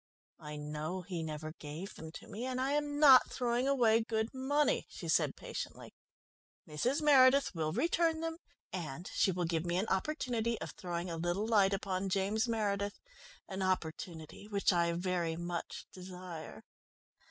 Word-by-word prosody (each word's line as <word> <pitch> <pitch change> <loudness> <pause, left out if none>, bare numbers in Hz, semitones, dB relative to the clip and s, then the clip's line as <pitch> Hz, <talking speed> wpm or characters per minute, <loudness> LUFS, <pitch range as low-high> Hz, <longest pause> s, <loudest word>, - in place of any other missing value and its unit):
"I 150 0 -7
know 150 +5 -4
he 180 -2 -4
never 155 0 -5
gave 160 +7 -7
them 160 0 -9
to - - -10
me, 220 +4 -6
and 255 -1 -2
I 265 +2 +1
am 290 0 0
not 270 -4 +8
throwing 245 +1 0
away 235 -5 +4
good 220 +1 -1
money," 285 +3 +1
she - - -8
said - - +2
patiently. - - -7 0.7
"Mrs. 245 - 0
Meredith 275 -3 +6
will 155 -3 -1
return 330 - +2
them, 330 0 -3 0.3
and 170 -1 -5
she 190 - +3
will 180 -1 -1
give 165 -1 0
me 175 0 -1
an 200 +4 0
opportunity 235 0 0
of - - -5
throwing 175 -3 -4
a 165 - -3
little 175 +5 -1
light 205 -4 +4
upon 195 -1 -1
James 200 +4 +1
Meredith, 205 -3 -1 0.5
an 190 -1 -5
opportunity 170 0 -3
which 200 -2 +2
I 170 -1 +2
very 175 -2 -1
much 175 0 -5
desire." 180 -3 -8
190 Hz, 160 wpm, -33 LUFS, 170-245 Hz, 0.7 s, not